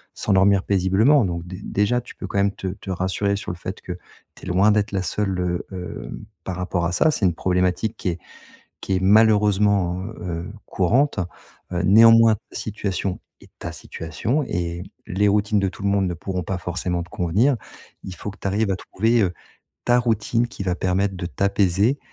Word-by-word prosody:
s'endormir 95 -1 +3
paisiblement, 100 +8 +3
donc 85 -1 -3
dé 90 +2 -8
déjà, 105 +5 +1
tu 120 - -13
peux - - -7
quand 100 - -2
même 100 0 +3
te - - -8
te 95 +1 -8
rassurer 95 +2 0
sur 100 - -5
le - - -5
fait 95 +3 -7
que - - -7 0.4
tu - - -14
es - - -8
loin 95 +4 +4
d'être 105 0 +1
la 95 -2 -1
seule, 95 +1 -1
heu, 90 -1 -1
hem, 90 -6 -7 0.2
par 95 - -4
rapport 90 -1 -1
à 85 - 0
ça. 155 - +3
C'est 110 - -3
une 85 -3 +2
problématique 90 +5 0
qui 90 - -2
est 85 - -3 0.6
qui 95 - -3
est - - +1
malheureusement, 100 -3 +4
heu 110 +3 -7 0.3
heu, - - -8 0.2
courante. 120 +11 +2 0.5
Heu, 90 - -1
néanmoins, 115 +2 +7
ta - - -18
situation 100 -3 -3 0.2
est - - -17
ta - - -6
situation 105 - -3
et 85 -5 -3 0.2
les 100 +3 +1
routines 105 0 +2
de 95 - +1
tout 95 - -12
le 100 - +2
monde 100 -1 +2
ne 90 - -2
pourront 90 +2 -4
pas 90 +1 -3
forcément 90 0 -2
te 90 - -15
convenir. 100 - +2 0.5
Il 95 - -7
faut 95 - -6
que 100 - -11
tu - - -15
arrives 105 +2 +1
à - - +1
trouver, 110 +5 +1
heu, 90 -1 0 0.5
ta 120 0 +4
routine 115 0 +1
qui 110 - -7
va 90 -2 0
permettre 95 +2 0
de 90 - -4
t'apaiser 100 - +1
95 Hz, 200 wpm, -22 LUFS, 90-105 Hz, 0.6 s, néanmoins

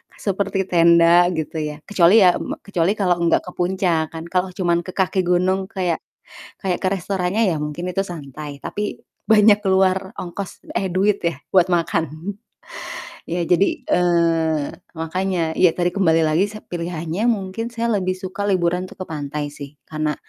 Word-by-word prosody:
seperti 195 -1 -1
tenda 170 +1 +6
gitu 160 0 -3
ya. 150 -1 -3
Kecuali 195 +1 +5
ya, 180 -1 +6
me - - -4
kecuali 195 0 0
kalau 180 -4 +1
nggak - - +3
ke 180 - -8
puncak 175 -3 0
kan 160 - -5
kalau 185 0 +1
cuma 170 -2 +1
ke 180 +1 -8
kaki 190 0 +1
gunung 185 +2 +1
kayak 185 -6 -1 0.6
kayak 185 -2 0
ke 190 - -1
restorannya 190 +3 -1
ya 170 -7 +1
mungkin 150 +5 -4
itu 195 +2 0
santai, 145 -3 -8
tapi 210 0 -4 0.3
banyak 210 -1 +6
keluar 190 -1 +2
ongkos 180 +2 -7
eh 190 - -1
duit 195 +3 +1
ya 170 -5 0 0.2
buat 185 -1 +5
makan. 165 +1 -1 1.0
Iya 175 +1 -1
jadi, 180 +3 +4 0.2
eee, 165 -3 +2 0.3
makanya 165 0 -1
iya 180 -2 +6
tadi 175 0 +1
kembali 165 -4 +3
lagi 160 +6 +2
se 215 +1 -10
pilihannya 170 +4 -3
mungkin 215 0 -1
saya 235 0 -1
lebih 185 0 -1
suka 190 +2 -4
liburan 180 -1 +1
tuh - - -12
ke 185 - -2
pantai 145 -1 -4
sih, 145 0 -10
karena 155 -1 -1
180 Hz, 165 wpm, -21 LUFS, 165-190 Hz, 1.0 s, tenda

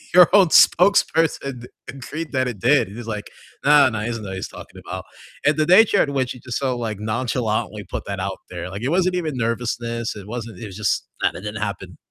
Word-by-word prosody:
your 180 -3 +9
own 200 -3 +7
spokesperson 160 -9 +3 0.2
agreed 150 +4 -6
that 130 -1 +1
it 110 -5 -5
did." 135 -3 +3
And 100 - -11
he's 120 - -8
like, 105 -2 -5 0.3
"Nah, 145 -1 +6
nah, 110 -4 -3
he 105 - -3
doesn't 115 -2 -4
know 100 - -7
what 95 - -5
he's 95 - -5
talking - - -12
about." - - -6 0.4
And 150 - +4
the 155 0 +1
nature 200 +3 +6
in 140 - -2
which 130 -2 -1
he 125 - -13
just 125 -2 -4
so, 130 -3 -1
like, 110 -4 -4
nonchalantly 110 -2 -2
put - - -6
that 100 -1 -4
out 95 0 -3
there, 90 -1 -6
like, 100 +3 -7
it 130 - -1
wasn't 180 +1 +2
even 160 -5 -2
nervousness, 115 0 -2
it 100 -2 -10
wasn't 115 0 -6
it 110 - -6
was 95 - -10
just, 105 - -1 0.2
"Nah, - - +2
that 95 - -9
didn't 105 +1 -5
happen, 95 -4 -5
120 Hz, 235 wpm, -22 LUFS, 105-145 Hz, 0.4 s, your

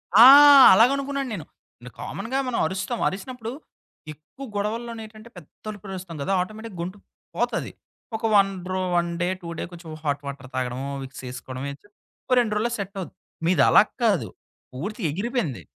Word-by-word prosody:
ఆ! 225 +3 +10 0.5
అలాగనుకున్నాను 275 +4 +2
నేను. 165 -8 -6 0.4
ఇగ 125 - -10
కామన్‌గా 230 +7 -4
మనం 250 - -1
అరుస్తాం. 190 +5 -3
అరిసినప్పుడు 225 +4 -5 0.6
ఎక్కువ 155 - -12
గొడవల్లోనేటంటే 220 +1 -5
పెద్ద 165 +4 -16
అరుపులు 200 -2 -9
అరుస్తాం 175 -4 -8
కదా! 195 - -1
ఆటోమేటిక్‌గా 215 -1 -7
గొంతు 185 +4 -5 0.4
పోతది. - - -1 0.4
ఒక 220 - -6
వన్ 195 -1 +5 0.2
రొ 185 0 -1
1 170 0 +1
డే, 175 - +1
2 170 - -9
డే - - -2
కొంచెం 170 -1 -11
హాట్ 145 -1 -1
వాటర్ 140 -2 -7
తాగడము, 130 +2 -3
విక్స్ 135 0 -10
ఏసుకోవడం 130 +1 -7
ఇచ్చ 145 - -18 0.4
ఓ - - -8
2 220 -3 +1
రోజుల్లో 235 +3 0
సెట్టవుద్ది. 195 -1 -6 0.3
మీది 175 +2 +3
అలాగా 210 - +5
కాదు. 190 - +2 0.5
పూర్తిగా 195 - -4
ఎగిరిపోయింది. 200 - -2
195 Hz, 150 wpm, -24 LUFS, 165-225 Hz, 0.6 s, ఆ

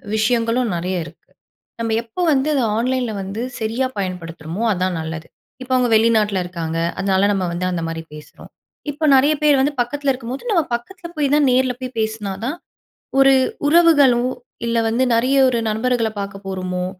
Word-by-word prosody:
விஷயங்களும் 230 +1 +1
நெறைய 180 +2 -2
இருக்கு. - - -16 0.5
நம்ப 225 -1 -2
எப்போ 230 +10 -6
வந்து 275 +3 +1
அதை 260 - +2
ஆன்லைன்ல 250 -1 0
வந்து 195 +4 -5 0.2
சரியா 225 +4 -1
பயன்படுத்துறோமோ 175 0 -5
அதான் 180 -1 -1
நல்லது. 160 0 -6 0.4
இப்ப 255 - -10
அவங்க 250 -2 +2
வெளிநாட்டில 215 -4 +3
இருக்காங்க, 165 -2 -4 0.2
அதனால 195 0 +2
நம்ம 190 -2 0
வந்து 180 +1 -2
அந்த 170 -2 -2
மாரி 165 0 -4
பேசுறோம். 150 0 -13 0.4
இப்ப 305 +2 -1
நெறைய 285 +4 +4
பேர் 290 -3 +5
வந்து 290 +2 +1
பக்கத்தில 280 +3 -1
இருக்கும்போது 255 - -6
நம்ம 335 -5 +3
பக்கத்தில 345 +9 -8
போய் 285 -2 +1
தான் 295 -2 +3
நேரில 255 0 +2
போய் 255 -1 -7
பேசினா 220 -3 -2
தான், 290 +6 -2 0.6
ஒரு 270 0 +6 0.4
உறவுகளும் 285 -7 +5 0.4
இல்ல 230 0 0
வந்து 235 +3 +1
நெறைய 255 +4 +2
ஒரு 240 -2 +1
நண்பர்களை 230 0 0
பார்க்க 195 0 -7
போறோமோ, 185 -1 -3
230 Hz, 160 wpm, -20 LUFS, 190-260 Hz, 0.6 s, ஒரு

